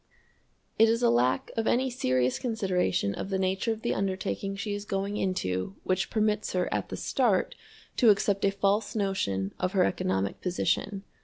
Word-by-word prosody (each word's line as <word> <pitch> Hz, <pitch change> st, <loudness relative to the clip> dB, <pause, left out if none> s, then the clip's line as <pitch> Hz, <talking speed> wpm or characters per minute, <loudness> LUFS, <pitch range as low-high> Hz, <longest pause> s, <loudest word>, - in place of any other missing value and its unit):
It 225 Hz, 0 st, +7 dB
is 230 Hz, +2 st, +1 dB
a -, -, +5 dB
lack 125 Hz, +2 st, +1 dB
of 225 Hz, -1 st, -1 dB
any 260 Hz, +1 st, +2 dB
serious 130 Hz, -, +1 dB
consideration 190 Hz, -, 0 dB
of 195 Hz, -, -5 dB
the 195 Hz, -, 0 dB
nature 190 Hz, +4 st, 0 dB
of 220 Hz, 0 st, -5 dB
the -, -, +1 dB
undertaking 195 Hz, 0 st, -2 dB
she 205 Hz, +1 st, -3 dB
is 205 Hz, 0 st, -4 dB
going 200 Hz, 0 st, -2 dB
into 95 Hz, -, -2 dB
which 185 Hz, 0 st, 0 dB
permits 215 Hz, -1 st, 0 dB
her 180 Hz, -1 st, +1 dB
at -, -, -2 dB
the -, -, -5 dB
start -, -, +1 dB, 0.4 s
to 235 Hz, -, +6 dB
accept 200 Hz, -1 st, +2 dB
a 200 Hz, -, +5 dB
false 200 Hz, +2 st, 0 dB
notion 100 Hz, -, -1 dB
of 185 Hz, 0 st, -1 dB
her 190 Hz, -2 st, +4 dB
economic 95 Hz, -, -1 dB
position. 195 Hz, +2 st, -1 dB
195 Hz, 175 wpm, -28 LUFS, 180-210 Hz, 0.4 s, It